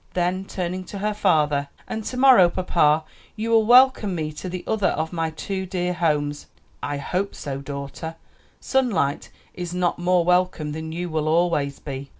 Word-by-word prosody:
Then 180 Hz, +2 st, 0 dB
turning 185 Hz, -1 st, -4 dB
to 200 Hz, -, -8 dB
her 210 Hz, +2 st, -1 dB
father, 150 Hz, -8 st, +2 dB, 0.2 s
"And 220 Hz, -, -4 dB
to 255 Hz, -, -4 dB
morrow, 255 Hz, -9 st, +7 dB
papa, 160 Hz, -4 st, +2 dB, 0.3 s
you 225 Hz, +1 st, -3 dB
will 220 Hz, -1 st, +4 dB
welcome 245 Hz, -5 st, +5 dB
me 155 Hz, -2 st, -3 dB
to 155 Hz, +5 st, -7 dB
the 180 Hz, 0 st, -5 dB
other 215 Hz, -3 st, +1 dB
of 160 Hz, +2 st, -2 dB
my 165 Hz, -1 st, -1 dB
two 190 Hz, +4 st, -4 dB
dear 180 Hz, -1 st, -1 dB
homes." 150 Hz, -4 st, -1 dB, 0.3 s
"I 145 Hz, 0 st, -3 dB
hope 185 Hz, +7 st, -2 dB
so, 135 Hz, -1 st, -5 dB
daughter; 140 Hz, +3 st, -6 dB, 0.4 s
sunlight 205 Hz, -, 0 dB, 0.2 s
is 175 Hz, 0 st, -5 dB
not 180 Hz, -1 st, 0 dB
more 175 Hz, -1 st, +2 dB
welcome 180 Hz, -4 st, +1 dB
than 160 Hz, +1 st, -5 dB
you 175 Hz, +2 st, -3 dB
will 155 Hz, -1 st, -1 dB
always 155 Hz, -4 st, +1 dB
be." 140 Hz, -1 st, -7 dB
175 Hz, 170 wpm, -23 LUFS, 150-190 Hz, 0.4 s, morrow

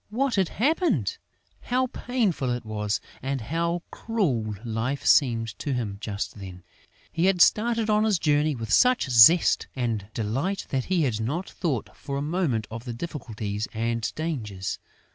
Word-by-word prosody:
What 255 Hz, +4 st, 0 dB
had 190 Hz, -5 st, +2 dB
happened? 330 Hz, -, +1 dB, 0.4 s
How 255 Hz, +1 st, +1 dB
painful 230 Hz, -, -1 dB
it 120 Hz, -1 st, -2 dB
was! 105 Hz, -1 st, -2 dB, 0.2 s
And 135 Hz, +1 st, -2 dB
how 170 Hz, +7 st, -2 dB
cruel 135 Hz, -, -1 dB
life 120 Hz, +5 st, -2 dB
seemed 115 Hz, -5 st, +4 dB
to 145 Hz, -, -2 dB
him 105 Hz, -5 st, -3 dB
just 105 Hz, -1 st, -4 dB
then! 90 Hz, -2 st, -9 dB, 0.5 s
He 165 Hz, -, 0 dB
had 190 Hz, -2 st, +2 dB
started 225 Hz, +4 st, +4 dB
on 215 Hz, 0 st, +3 dB
his 215 Hz, -3 st, +3 dB
journey 150 Hz, -1 st, +2 dB
with 115 Hz, -3 st, -3 dB
such 250 Hz, -, +4 dB
zest 125 Hz, +8 st, +6 dB
and 115 Hz, -6 st, -2 dB
delight 135 Hz, -, -2 dB
that 130 Hz, -2 st, -1 dB
he 185 Hz, -3 st, +1 dB
had 115 Hz, -5 st, 0 dB
not 155 Hz, -, -2 dB
thought 145 Hz, -, -3 dB
for 140 Hz, -1 st, -5 dB
a -, -, -2 dB
moment 150 Hz, -, 0 dB
of 115 Hz, +2 st, -7 dB
the 120 Hz, -, -4 dB
difficulties 115 Hz, -7 st, -4 dB
and 115 Hz, 0 st, -1 dB
dangers. 110 Hz, -, -4 dB
135 Hz, 160 wpm, -26 LUFS, 115-185 Hz, 0.5 s, zest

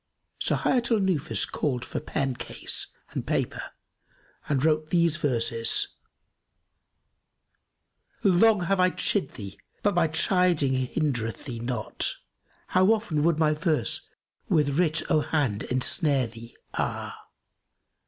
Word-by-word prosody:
So -, -, +1 dB
Hayat 240 Hz, -2 st, +1 dB
al 230 Hz, -, +3 dB
Nufus 175 Hz, -5 st, +1 dB
called 130 Hz, -5 st, -2 dB
for -, -, -4 dB
pen 135 Hz, -3 st, -2 dB
case 120 Hz, 0 st, -2 dB, 0.2 s
and -, -, -3 dB
paper -, -, -1 dB, 0.9 s
and 140 Hz, -1 st, +1 dB
wrote 155 Hz, -1 st, +1 dB
these 170 Hz, -2 st, +2 dB
verses, 115 Hz, -6 st, 0 dB, 2.3 s
"Long 200 Hz, +2 st, +5 dB
have 185 Hz, +2 st, 0 dB
I 185 Hz, 0 st, +5 dB
chid 185 Hz, -4 st, -1 dB
thee 100 Hz, -4 st, -9 dB, 0.2 s
but 205 Hz, -, +3 dB
my 175 Hz, -2 st, +3 dB
chiding 165 Hz, -3 st, +2 dB
hindereth 130 Hz, -3 st, -2 dB
thee 120 Hz, -4 st, -5 dB
not 120 Hz, -2 st, -1 dB, 0.3 s
* -, -, -37 dB
How 185 Hz, +1 st, +4 dB
often 210 Hz, -9 st, 0 dB
would 165 Hz, 0 st, +2 dB
my 155 Hz, -1 st, +3 dB
verse 155 Hz, 0 st, 0 dB, 0.4 s
with 150 Hz, -4 st, +2 dB
writ 165 Hz, -2 st, +2 dB
o' 155 Hz, -, +5 dB
hand 135 Hz, -10 st, -1 dB
ensnare 130 Hz, +2 st, +2 dB
thee, 115 Hz, +1 st, -11 dB, 0.2 s
ah! -, -, -3 dB
155 Hz, 125 wpm, -26 LUFS, 130-175 Hz, 2.3 s, Long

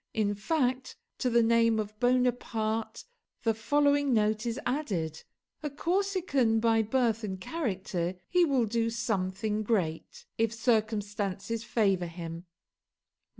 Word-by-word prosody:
In 210 Hz, -2 st, +1 dB
fact, 255 Hz, +3 st, -1 dB, 0.2 s
to 250 Hz, -, +1 dB
the 235 Hz, -1 st, +4 dB
name 230 Hz, -1 st, +3 dB
of 210 Hz, 0 st, -5 dB
Bonaparte 240 Hz, -3 st, 0 dB, 0.4 s
the 225 Hz, -, +3 dB
following 285 Hz, +3 st, +2 dB
note 215 Hz, +1 st, +1 dB
is 235 Hz, +3 st, -2 dB
added: 190 Hz, -, -2 dB, 0.4 s
"a 300 Hz, -, -3 dB
Corsican 330 Hz, -, +1 dB
by 225 Hz, 0 st, +3 dB
birth 230 Hz, 0 st, +1 dB
and 190 Hz, -3 st, -4 dB
character 190 Hz, -, -2 dB
he 360 Hz, -1 st, +3 dB
will 270 Hz, -7 st, +2 dB
do 230 Hz, +1 st, 0 dB
something 215 Hz, -2 st, -1 dB
great, 185 Hz, -8 st, -2 dB
if 225 Hz, -1 st, +2 dB
circumstances 215 Hz, -2 st, -1 dB
favour 195 Hz, -7 st, +1 dB
him." 165 Hz, 0 st, -7 dB
225 Hz, 120 wpm, -29 LUFS, 205-250 Hz, 0.4 s, the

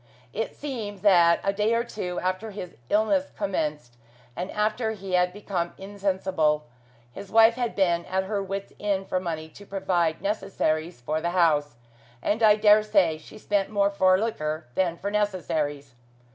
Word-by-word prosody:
It 225 Hz, -, -3 dB
seems 220 Hz, -9 st, -5 dB
that 175 Hz, -4 st, +5 dB
a 195 Hz, -, +1 dB
day 210 Hz, +3 st, +1 dB
or 235 Hz, -, +1 dB
two 180 Hz, -6 st, -4 dB
after 185 Hz, +4 st, -2 dB
his 195 Hz, -4 st, -8 dB
illness 275 Hz, +7 st, +2 dB
commenced, 150 Hz, -11 st, -3 dB, 0.4 s
and 180 Hz, +8 st, -4 dB
after 215 Hz, +2 st, 0 dB
he 195 Hz, -2 st, -8 dB
had 180 Hz, 0 st, +3 dB
become 185 Hz, -3 st, -4 dB
insensible, 190 Hz, -6 st, 0 dB, 0.5 s
his 195 Hz, +10 st, -9 dB
wife 225 Hz, +1 st, +7 dB
had 240 Hz, -1 st, -3 dB
been 175 Hz, -3 st, +2 dB
at 190 Hz, +1 st, -1 dB
her 200 Hz, +1 st, -2 dB
wits' 195 Hz, 0 st, -5 dB
end 195 Hz, -2 st, -1 dB
for 185 Hz, -, +1 dB
money 160 Hz, -3 st, -4 dB
to 200 Hz, -, -14 dB
provide 180 Hz, -5 st, 0 dB
necessaries 175 Hz, -, -1 dB
for 155 Hz, +6 st, -2 dB
the 170 Hz, -, 0 dB
house, 150 Hz, -6 st, +3 dB, 0.4 s
and 210 Hz, -, -1 dB
I 215 Hz, -2 st, +7 dB
dare 210 Hz, 0 st, +6 dB
say 195 Hz, -7 st, +2 dB
she 155 Hz, -, -13 dB
spent 205 Hz, -2 st, 0 dB
more 200 Hz, -1 st, +2 dB
for 185 Hz, -2 st, +4 dB
liquor 155 Hz, -8 st, -2 dB
than 175 Hz, 0 st, 0 dB
for 200 Hz, +3 st, -4 dB
necessaries. 155 Hz, -9 st, -1 dB
195 Hz, 165 wpm, -26 LUFS, 170-210 Hz, 0.5 s, wife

